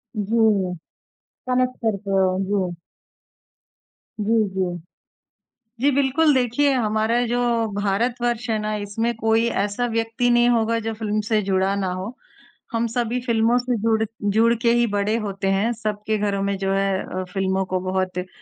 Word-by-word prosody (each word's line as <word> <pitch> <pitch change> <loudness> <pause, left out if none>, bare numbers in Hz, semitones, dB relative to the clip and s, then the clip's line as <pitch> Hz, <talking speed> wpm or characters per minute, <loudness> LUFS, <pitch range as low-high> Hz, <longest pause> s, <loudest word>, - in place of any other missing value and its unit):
जी, 210 -3 +2 0.7
connect 255 0 +1
करते 200 -2 -1
हो। 190 -1 +2
जी। 190 -3 -1 1.4
जी, 220 +1 +2
जी। 185 -2 -2 1.0
जी, 280 +3 +4
बिल्कुल 280 +3 +3
देखिए, 260 +3 +2
हमारा 220 -1 +1
जो 240 +1 0 0.3
भारतवर्ष 235 +4 -1
है 220 - +1
ना, 215 0 -2
इसमें 210 +3 -2
कोई 225 +1 +2 0.2
ऐसा 205 +4 -1
व्यक्ति 230 +1 0
नहीं 240 0 +4
होगा 230 -1 +2
जो 225 0 -3
फ़िल्म 215 -1 -1
से 215 -2 +2
जुड़ा 190 0 +1
ना 195 - -1
हो, 190 +7 -5 0.6
हम 230 0 0
सभी 240 +1 -1
फ़िल्मों 230 0 +3
से 250 0 0
जुड़ 220 -1 +2 0.3
जुड़ 230 +2 +4
के 235 -1 +3
ही 240 0 +3
बड़े 205 +1 0
होते 195 -3 -3
हैं, 200 +5 +1
सबके 215 -1 -2
घरों 205 -1 -1
में 200 0 -1
जो 195 0 -1
है 195 -1 +1 0.2
अ, - - -3
फ़िल्मों 190 0 0
को 185 0 -1
बहुत 185 0 -2
अ, 180 0 -3
220 Hz, 155 wpm, -22 LUFS, 195-235 Hz, 1.4 s, जी